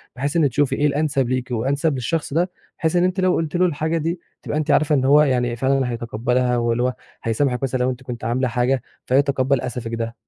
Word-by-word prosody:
بحيث 140 +4 -2
إن 145 -4 +4
تشوفي 145 +2 +1
إيه 150 - +2
الأنسب 140 -3 0
ليكِ 130 0 -2
وأنسب 140 +6 0
للشخص 140 +4 -2
ده، 175 +4 +1 0.3
بحيث 160 +1 0
إن 175 - +4
أنتِ 185 +1 0
لو 185 -1 +3
قُلتِ 160 0 -2
له 180 - +4
الحاجة 160 0 0
دي 165 +2 -2 0.2
تبقى 150 - -2
أنتِ 155 - 0
عارفة 155 0 +3
إن 130 -1 +1
هو 145 +2 +6
يعني 125 -4 +1
فعلًا 135 +1 +1
هيتقبّلها 120 +2 0
واللي 120 0 +1
هو 125 0 +1 0.3
هيسامحِك 125 +2 0
مثلًا 130 -1 -1
لو 125 - +2
أنتِ 130 0 -5
كنتِ 120 -3 -7
عاملة 125 +3 0
حاجة 125 +2 +1 0.2
فيتقبّل 135 -1 +2
أسفِك 120 -2 -4
ده. 115 0 -4
130 Hz, 215 wpm, -21 LUFS, 125-150 Hz, 0.3 s, هو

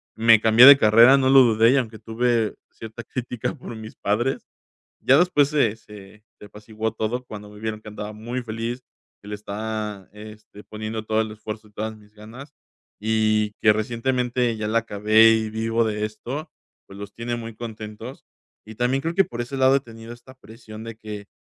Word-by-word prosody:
me 115 0 +5
cambié 115 +3 +7
de 140 0 +11
carrera, 115 +4 +6
no 130 -1 +2
lo 135 0 +8
dudé, 115 0 +4
y 140 - +3
aunque 115 -4 -3
tuve 115 -1 -1 0.2
cierta 115 +1 -10
crítica 125 +1 -5
por 125 - -10
mis 110 0 -10
padres, 120 +6 -1 0.6
ya 135 - +4
después 160 -6 +3
se 115 -8 +1
se 105 -1 -15 0.2
se - - -12
apaciguó 110 +2 -5
todo 115 +3 -3
cuando 105 -1 -10
me 105 0 -14
vieron 110 -1 -4
que - - -11
andaba 105 0 -7
muy 120 +4 -5
feliz, 115 +2 -5 0.4
que 100 - -13
le 105 - -5
estaba 105 -1 -6
este, 105 0 -13
poniendo 110 0 -6
todo 110 0 0
el 110 -1 -3
esfuerzo 110 0 -9
y - - -26
todas 110 +1 -5
mis 105 0 -21
ganas, 120 +8 -12 0.5
y 110 -1 +1
que 105 - +5
recientemente 120 +1 -1
ya 105 -1 -4
la 115 +1 +2
acabé, 110 +1 +4
y 110 -1 -1
vivo 115 +1 -1
de 105 -1 -2
esto, 130 +9 -7 0.4
pues, 100 - -13
los 100 0 -9
tiene 120 +1 -4
muy 115 -1 -8
contentos. 110 +2 -9 0.4
Y 110 -1 -11
también, 125 +3 0
creo 165 +1 -3
que 195 0 +4
por 120 0 -8
ese 135 +3 -7
lado 130 +1 +4
he - - 0
tenido 115 -2 -12
esta 130 +2 -15
presión 110 -2 -12
de 115 -1 -8
que, 105 -2 -9
110 Hz, 195 wpm, -23 LUFS, 105-120 Hz, 0.6 s, de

